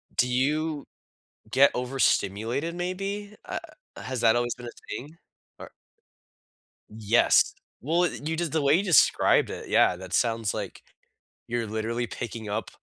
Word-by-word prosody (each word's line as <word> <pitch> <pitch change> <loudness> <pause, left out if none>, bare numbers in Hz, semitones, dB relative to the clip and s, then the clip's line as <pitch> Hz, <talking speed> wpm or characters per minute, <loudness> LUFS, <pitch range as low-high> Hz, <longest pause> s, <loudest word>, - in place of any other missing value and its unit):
Do 125 - +3
you 150 +4 0 0.6
get 135 +4 +6
overstimulated, 125 - 0
maybe, 195 +4 -4
uh, - - -4 0.4
has 130 -2 -5
that 115 0 +4
always 120 0 0
been 125 - -10
a 120 - -10 0.2
thing? 150 +6 -10 0.4
Or - - -10 1.2
Yes. 110 +2 +3 0.3
Well, 165 +7 +1
it 155 -3 -2
you 160 - -1
j 175 - 0
the 160 -1 -1
way 140 +1 +4
you 185 - +1
described 180 -5 +4
it, - - -7
yeah, - - +4
that 95 +1 -9
sounds 115 -3 +1
like - - -6 0.7
you're 120 -1 -2
literally 115 +3 -2
picking 115 -2 -6
up 105 0 -3
125 Hz, 145 wpm, -26 LUFS, 115-160 Hz, 1.2 s, get